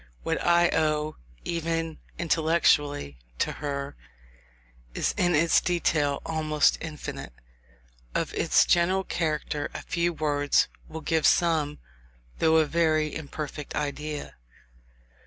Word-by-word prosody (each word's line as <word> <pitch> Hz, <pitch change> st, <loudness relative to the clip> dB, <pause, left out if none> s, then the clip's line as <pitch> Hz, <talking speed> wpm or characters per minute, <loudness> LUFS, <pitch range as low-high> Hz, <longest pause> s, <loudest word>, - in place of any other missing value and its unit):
What -, -, -1 dB
I 175 Hz, 0 st, +4 dB
owe, 155 Hz, 0 st, 0 dB, 0.3 s
even 165 Hz, -1 st, -2 dB, 0.2 s
intellectually, 155 Hz, -, +1 dB, 0.2 s
to -, -, 0 dB
her, 140 Hz, -1 st, -4 dB, 1.0 s
is -, -, 0 dB
in 175 Hz, -2 st, +2 dB
its 165 Hz, +3 st, +4 dB
detail, 155 Hz, -5 st, 0 dB
almost 155 Hz, -2 st, +2 dB
infinite; 155 Hz, -, -6 dB, 0.8 s
of -, -, -1 dB
its -, -, +3 dB
general 185 Hz, +2 st, +3 dB
character 150 Hz, -4 st, -2 dB
a -, -, -5 dB
few 170 Hz, 0 st, 0 dB
words 145 Hz, -3 st, +1 dB, 0.2 s
will 160 Hz, 0 st, -7 dB
give 160 Hz, 0 st, +2 dB
some, 155 Hz, -4 st, +2 dB, 0.6 s
though 160 Hz, 0 st, +4 dB
a 160 Hz, -, +4 dB
very 155 Hz, -1 st, +1 dB
imperfect, 150 Hz, -1 st, -6 dB
idea. 150 Hz, 0 st, -4 dB
155 Hz, 110 wpm, -27 LUFS, 150-165 Hz, 1.0 s, I